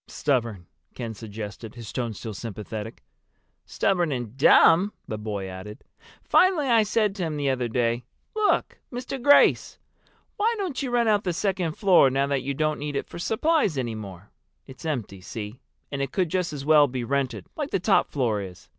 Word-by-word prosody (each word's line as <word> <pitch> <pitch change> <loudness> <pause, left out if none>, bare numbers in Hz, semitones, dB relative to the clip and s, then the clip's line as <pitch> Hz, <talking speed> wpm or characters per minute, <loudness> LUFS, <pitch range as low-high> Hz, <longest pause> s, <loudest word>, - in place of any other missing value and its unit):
"Stubborn," 115 -10 -1 0.3
Ken 115 -3 -5
suggested, 110 +1 -8
his 115 -3 -9
tone 120 -4 -3
still 110 +2 -6
sympathetic. 110 +1 -7 0.6
"Stubborn 175 -5 +1
and 120 -3 -4
dumb," 165 +7 +6
the 110 - -4
boy 105 -2 -4
added. 95 +3 -9 0.4
"Finally 365 -6 +4
I 230 -2 +5
said 210 -1 +1
to 195 -3 -4
him 155 -2 -2
the 140 -2 +1
other 125 -2 -1
day, 120 0 0 0.3
'Look, 430 -1 +1
Mr. 255 +1 -5
Grace, 285 +3 +5 0.6
why 445 +3 +2
don't 365 -10 -3
you 270 - -2
rent 240 -1 +2
out 210 -1 +3
the 180 - -1
second 185 -3 -1
floor 180 -8 +5
now 135 +1 +1
that 140 -1 -1
you 140 +1 -3
don't 155 +1 0
need 145 0 -4
it - - -1
for - - -10
supplies 220 - +1
any 120 -3 -2
more?' 100 -3 -9 0.3
It's 130 +5 -12
empty, 115 -11 -3
see? 105 +5 -7 0.3
And 140 -1 -3
it 135 -1 -2
could 185 -4 0
just 180 -1 -1
as 140 -2 -6
well 150 -1 +6
be 125 -1 -4
rented, 135 +1 -2
like 295 -2 -3
the 195 - 0
top 195 +3 +3
floor 115 -7 0
is. 90 -2 -10
140 Hz, 185 wpm, -25 LUFS, -, 0.6 s, dumb